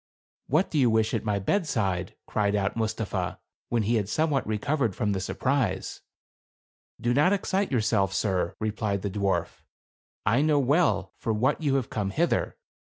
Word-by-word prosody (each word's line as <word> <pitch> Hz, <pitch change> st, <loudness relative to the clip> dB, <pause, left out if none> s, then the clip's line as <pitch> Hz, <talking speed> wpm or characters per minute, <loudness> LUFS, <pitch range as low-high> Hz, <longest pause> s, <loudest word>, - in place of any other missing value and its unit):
" -, -, -
What 155 Hz, +8 st, +2 dB
do 155 Hz, -, +1 dB
you 125 Hz, -3 st, +5 dB
wish 110 Hz, -1 st, +2 dB
at -, -, -1 dB
my 105 Hz, -2 st, 0 dB
bed 165 Hz, -, 0 dB
side?" 95 Hz, -, -1 dB
cried 105 Hz, -1 st, 0 dB
out 100 Hz, -1 st, 0 dB
Mustapha, 110 Hz, -5 st, -2 dB, 0.3 s
when 115 Hz, -2 st, +1 dB
he 115 Hz, +3 st, +2 dB
had 100 Hz, -2 st, -2 dB
some 155 Hz, +6 st, +1 dB
what 135 Hz, -6 st, 0 dB
recovered 115 Hz, 0 st, 0 dB
from 105 Hz, -, 0 dB
the 95 Hz, -, -1 dB
surprise. 110 Hz, 0 st, -1 dB, 0.5 s
" -, -, -84 dB
Do 120 Hz, +1 st, +1 dB
not 150 Hz, +8 st, +4 dB
excite 195 Hz, 0 st, 0 dB
yourself, 110 Hz, -5 st, +2 dB
sir," 95 Hz, -3 st, 0 dB
replied 105 Hz, -2 st, -2 dB
the 100 Hz, -, -2 dB
dwarf. 100 Hz, -1 st, -1 dB, 0.3 s
" -, -, -63 dB
I 135 Hz, -, +3 dB
know 150 Hz, -1 st, +3 dB
well 145 Hz, +5 st, +2 dB
for 115 Hz, -, -1 dB
what 130 Hz, +9 st, +1 dB
you 140 Hz, -3 st, +1 dB
have 130 Hz, -4 st, -1 dB
come 100 Hz, -3 st, -1 dB
hither; 165 Hz, -, +1 dB
THE -, -, +3 dB
CARAVAN. -, -, -18 dB
110 Hz, 195 wpm, -27 LUFS, 100-140 Hz, 0.5 s, you